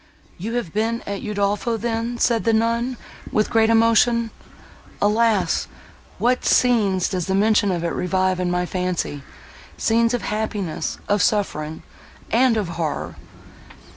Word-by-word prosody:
"You 220 +6 -4
have 240 -10 -3
been 225 +2 -1
at 200 -1 -4
Udolpho 205 +2 -1
then!" 230 +1 -2
said 235 -1 +2
the 230 - +2
nun, 230 +3 0 0.3
with 215 - +1
great 225 -1 +3
emotion. 230 0 +3 0.7
"Alas! 210 -4 +2 0.5
what 250 +1 +1
scenes 205 -7 +3
does 185 -2 -3
the 190 - 0
mention 205 0 +3
of 175 -2 -2
it 170 - 0
revive 185 0 0
in 180 -1 0
my 180 0 0
fancy—scenes 185 - -2
of 235 - -4
happiness—of 205 -1 -2
suffering—and 205 +6 -1
of 205 -4 -1
horror!" 150 - -3
210 Hz, 125 wpm, -22 LUFS, 185-230 Hz, 0.7 s, great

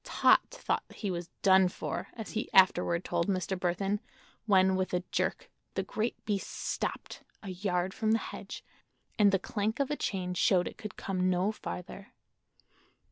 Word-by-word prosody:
Tot - - +5
thought - - -3
he 205 -4 -3
was 175 -1 -4 0.2
"done 190 -1 +6
for," 180 - -4
as 220 -3 -7
he 220 - -3
afterward 180 -2 +4
told 170 - 0
Mr. 190 -1 0
Burthon, 190 +3 0 0.5
when 190 -2 +5
with 185 -1 0
a 180 - -1
jerk - - -1 0.2
the - - 0
great 220 +2 -2
beast 205 -2 -1
stopped—a 200 - -5
yard 185 0 -1
from 220 - -1
the 225 - +5
hedge—and 210 -2 -3
the 195 - +4
clank 210 +5 -2
of 280 0 0
a - - +1
chain 185 -8 -2
showed 180 0 +3
it - - -9
could 215 -3 -7
come 185 -1 0
no 185 +3 +2
farther. 195 -1 -8
190 Hz, 160 wpm, -31 LUFS, 180-210 Hz, 0.5 s, done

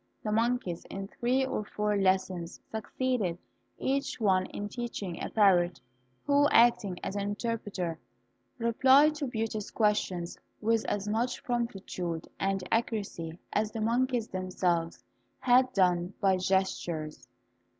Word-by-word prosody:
The 215 - -2
monkeys, 225 -5 0
in 195 0 -6
three 255 +4 +1
or 260 - -2
four 210 0 -1
lessons, 185 -3 0
succeeded 220 -4 -1 0.4
each 275 0 -1
one 190 -4 +2
in 205 - -5
teaching 205 -6 -5
a - - -3
parrot, 180 -5 +4 0.5
who, 285 0 +4
acting 225 -6 +4
as 195 - -3
an 200 - -1
interpreter, 205 -5 -3 0.6
replied 265 +6 +5
to 300 -2 -3
Beauty's 220 -3 -3
questions 190 -5 0 0.2
with 225 0 +1
as 205 0 -2
much 230 +4 -1
promptitude 195 -8 -3
and 195 -2 -1
accuracy 200 -8 -2 0.2
as 210 +1 +1
the 225 - -3
monkeys 240 +1 +1
themselves 180 -3 -1 0.3
had 255 +1 +4
done 180 -3 +2
by 195 -1 +4
gestures. 175 -7 -1
205 Hz, 125 wpm, -30 LUFS, 185-235 Hz, 0.6 s, replied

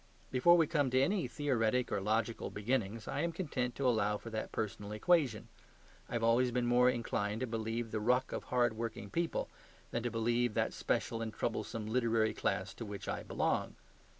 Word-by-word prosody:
Before 175 +7 +6
we 165 - +5
come 145 -4 +1
to 130 +1 +3
any 180 +2 +2
theoretic 125 -3 0
or 100 - 0
logical 110 +3 0
beginnings 110 -1 -2
I - - -2
am 170 - 0
content 135 -8 -2
to 135 0 0
allow 105 -3 +2
for 115 - -9
that 110 0 -3
personal 105 -1 -4
equation; 130 - +2 0.6
I - - -7
have 115 -1 0
always 120 +2 +4
been 120 0 0
more 125 +1 +5
inclined 110 -3 -1
to - - +1
believe 115 0 -3
the 110 - -1
ruck 125 +4 +2
of - - -4
hard 120 -2 +2
working 110 -2 -5
people 170 0 -1 0.4
than 120 - -1
to 120 - -1
believe 120 0 +1
that - - +1
special 115 -1 -1
and 110 -1 -3
troublesome 110 0 -3
literary 115 -1 +2
class - - -1
to - - -7
which 100 -1 -7
I - - -2
belong. - - -1
115 Hz, 190 wpm, -34 LUFS, 110-125 Hz, 0.6 s, Before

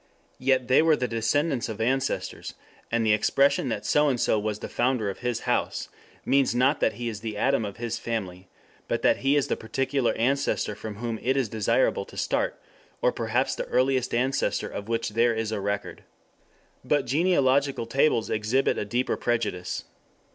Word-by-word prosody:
Yet 130 -1 +2
they 130 +3 +5
were 160 -1 +4
the 125 - -2
descendants 120 +4 0
of 110 -1 -6
ancestors, 130 +4 -2 0.4
and 115 -1 +1
the 110 - +4
expression 140 +5 +2
that 105 -3 -3
So 150 0 +3
and 125 -3 0
So 110 - +2
was 105 0 -2
the - - -6
founder 120 -4 0
of - - -11
his 120 -2 -2
house - - -1 0.4
means 135 -3 +2
not 130 +4 +3
that 110 - +2
he 120 +3 -5
is 110 -3 -4
the 110 -1 -5
Adam 135 +1 +2
of 100 -1 -7
his 115 -1 -3
family, 100 -6 -4 0.4
but - - -2
that - - +4
he 135 +2 +2
is 145 - +2
the - - 0
particular 130 +3 -1
ancestor 130 -2 0
from 105 0 -7
whom 115 +1 -4
it 130 +2 +1
is 130 -5 0
desirable 110 - +1
to - - -14
start, - - -1 0.4
or - - +2
perhaps - - 0
the - - -4
earliest 130 - +1
ancestor 130 +3 0
of 100 +2 -7
which 115 -1 -1
there 115 +2 +2
is 110 -1 -2
a 105 -2 -2
record. 100 +1 -3 0.8
But 145 -2 +1
genealogical 140 -3 +2
tables 115 -1 +1
exhibit 110 +5 +1
a - - -2
deeper 120 +5 -1
prejudice. 105 -7 -2
120 Hz, 185 wpm, -26 LUFS, 110-135 Hz, 0.8 s, they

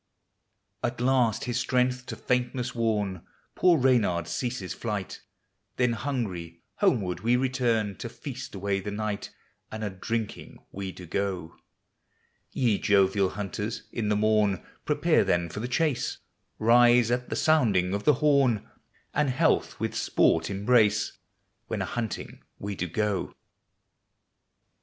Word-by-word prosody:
At 120 0 -2
last 125 -3 +2
his 120 0 -1
strength 125 0 0
to - - -5
faintnesg 125 0 -1
worn, 105 -6 -1 0.3
Poor 175 -2 +4
Reynard 110 - +2
ceases 120 -6 -3
flight; 105 -5 -4 0.5
Then 125 -2 +2
hungry, 100 - -4
homeward 110 - +1
we 115 +5 +2
return, 120 -5 +1
To - - -6
feast - - -8
away 100 0 -1
the 95 - -5
night, 105 0 -3 0.4
And 110 0 -5
a 105 - -2
drinking 110 +3 -4
we 95 -1 -5
do 90 0 -11
go. 90 -2 -3 0.9
Ye 115 -6 +1
jovial 100 -1 +3
hunters, 105 +3 -4
in 110 -3 -2
the 105 - +2
morn 105 -3 +2 0.2
Prepare - - +3
then 85 -1 +1
for 90 - -6
the 120 - -3
chase; 130 -1 0 0.4
Rise 120 +1 +5
at 125 0 -1
the - - -2
sounding 105 - +3
of 100 +1 -2
the 150 - +5
horn 135 -6 +2 0.5
And 150 -2 +2
health 155 +6 +1
with - - -2
sport 80 0 +2
embrace, 105 +2 +2 0.5
When - - -2
a - - -2
hunting 115 -4 -5 0.2
we 100 +1 -4
do 90 -2 -3
go. 105 +3 -1
110 Hz, 135 wpm, -27 LUFS, 100-125 Hz, 0.9 s, Rise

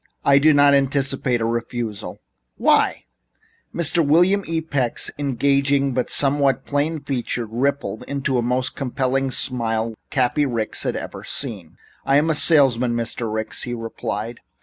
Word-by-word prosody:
I 140 0 +5
do 155 +2 +5
not 145 -1 +5
anticipate 135 -3 +1
a - - 0
refusal." 115 -2 -4 0.4
"Why?" - - +2 0.7
Mr. 170 0 +2
William 180 +7 +3
E. 165 0 -1
Peck's 140 -7 -1
engaging 140 0 +1
but 125 0 -1
somewhat 140 -2 +1
plain 150 +2 -1
features 125 -3 -3
rippled 125 -4 -1
into 140 -1 -2
the 125 - +2
most 125 +2 0
compelling 135 0 -1
smile 115 -4 -1 0.2
Cappy 130 +2 +1
Ricks 115 -4 -2
had - - -2
ever - - -7
seen. 105 - -3 0.3
"I 135 +1 +3
am 160 +2 +2
a - - +2
salesman, 130 -6 +4
Mr. 115 -1 -3
Ricks," 110 0 -4
he 120 -1 -4
replied. 115 0 -5
135 Hz, 145 wpm, -21 LUFS, 120-140 Hz, 0.7 s, I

